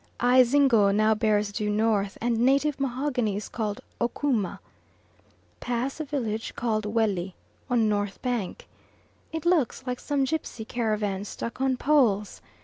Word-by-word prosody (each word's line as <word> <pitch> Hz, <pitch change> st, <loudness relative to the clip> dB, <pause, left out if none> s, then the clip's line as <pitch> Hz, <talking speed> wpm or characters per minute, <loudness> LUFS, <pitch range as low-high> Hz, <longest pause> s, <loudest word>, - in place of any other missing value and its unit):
Ayzingo 250 Hz, -3 st, +5 dB
now 215 Hz, +2 st, +3 dB
bears 210 Hz, -2 st, +1 dB
due 210 Hz, 0 st, -2 dB
north 210 Hz, -2 st, +1 dB
and 235 Hz, -1 st, 0 dB
native 275 Hz, +4 st, +2 dB
mahogany 255 Hz, -5 st, -1 dB
is 205 Hz, -, -4 dB
called 215 Hz, -3 st, -3 dB, 0.2 s
"Okooma." 235 Hz, -5 st, 0 dB, 1.0 s
Pass 245 Hz, +4 st, -2 dB
village 240 Hz, -8 st, -3 dB
called 215 Hz, -3 st, -1 dB
Welli 205 Hz, -4 st, 0 dB, 0.4 s
on 235 Hz, -3 st, +3 dB
north 205 Hz, -1 st, -1 dB
bank. 245 Hz, -7 st, -3 dB, 0.6 s
It 320 Hz, 0 st, -5 dB
looks 320 Hz, -8 st, +2 dB
like 250 Hz, -1 st, -3 dB
some 285 Hz, -2 st, 0 dB
gipsy 265 Hz, -5 st, -3 dB
caravans 210 Hz, -4 st, -2 dB
stuck 230 Hz, +2 st, -6 dB
on 265 Hz, -1 st, +1 dB
poles. 240 Hz, -9 st, +2 dB
230 Hz, 130 wpm, -26 LUFS, 210-260 Hz, 1.0 s, Ayzingo